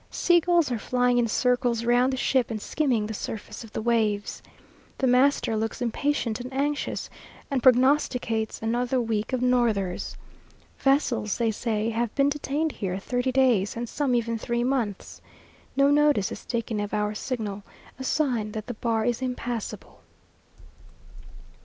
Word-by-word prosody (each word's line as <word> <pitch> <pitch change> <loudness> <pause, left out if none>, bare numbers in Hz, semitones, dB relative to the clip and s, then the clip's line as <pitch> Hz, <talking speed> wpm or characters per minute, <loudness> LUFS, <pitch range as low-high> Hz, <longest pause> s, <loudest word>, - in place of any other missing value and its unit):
Sea 350 -1 +3
gulls 340 -4 +2
are 235 - -1
flying 245 +2 +2
in 235 - +2
circles 245 0 +1
round 245 +2 +3
the 260 - -2
ship 260 -1 +1
and 220 -2 -3
skimming 245 -3 0
the 220 - -4
surface 215 +2 -6
of 225 - -12
the 220 - -4
waves. 215 -3 0 0.6
The 265 - 0
master 255 -2 +3
looks 220 +1 -2
impatient 245 -1 -1
and 250 +1 -7
anxious, 285 +2 -2 0.4
and 270 -2 +1
prognosticates 250 -4 +2
another 245 +3 0
week 220 -3 -1
of 255 -1 -1
northers. 225 -7 0 0.6
Vessels, 270 -6 +1
they 230 -2 +1
say, 220 0 -1
have 230 0 -2
been 280 0 +3
detained 295 +2 -1
here 190 -6 -3
thirty 245 +5 -1
days, 245 -6 +2
and 240 +1 -3
some 270 0 0
even 230 -1 -1
three 235 +2 -1
months! 245 -6 -2 0.6
No 275 +1 +5
notice 290 -8 +3
is - - -8
taken 230 -2 -2
of 205 +1 -2
our 210 0 0
signal 210 -3 -4 0.4
a - - -4
sign 245 -7 0
that 215 -1 -5
the 245 - -5
bar 225 -1 -1
is 240 0 0
impassable. 245 -3 -4
240 Hz, 155 wpm, -26 LUFS, 220-260 Hz, 0.6 s, No